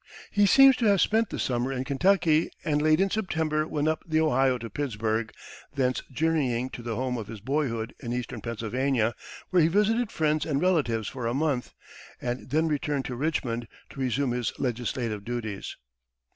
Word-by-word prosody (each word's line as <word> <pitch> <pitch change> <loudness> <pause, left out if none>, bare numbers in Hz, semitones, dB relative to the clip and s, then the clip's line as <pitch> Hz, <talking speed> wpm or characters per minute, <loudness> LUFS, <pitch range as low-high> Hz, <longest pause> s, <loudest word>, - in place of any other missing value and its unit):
He 205 0 +4
seems 270 +4 +8
to 230 - +2
have 200 -2 +4
spent 220 +4 +2
the - - -5
summer 125 +1 -1
in 130 -1 -2
Kentucky, 160 +3 +2 0.2
and 150 -2 +1
late 155 0 +4
in 195 0 +2
September 160 -7 0
went 150 -1 -1
up 155 0 0
the 155 -1 0
Ohio 135 -4 +3
to 115 -1 -6
Pittsburg, 110 -4 -2 0.4
thence 130 -2 +1
journeying 130 -4 0
to - - -7
the 115 -1 -4
home 125 0 -2
of 105 - -6
his 110 -1 -8
boyhood 120 -2 -2
in 120 - -5
eastern 120 -2 -4
Pennsylvania, 115 +2 0 0.4
where 180 -2 +5
he 155 - +5
visited 210 +6 +2
friends 155 -1 +1
and 140 -3 0
relatives 140 - +1
for 125 -3 -4
a 120 - -1
month, 140 -4 -1 0.4
and 125 +1 -4
then 160 +4 +2
returned 145 -2 -1
to 125 - -4
Richmond 120 -5 -2 0.2
to - - -11
resume 130 0 0
his 120 -2 -1
legislative 120 -3 -2
duties. 110 -4 -5
135 Hz, 180 wpm, -27 LUFS, 120-155 Hz, 0.4 s, seems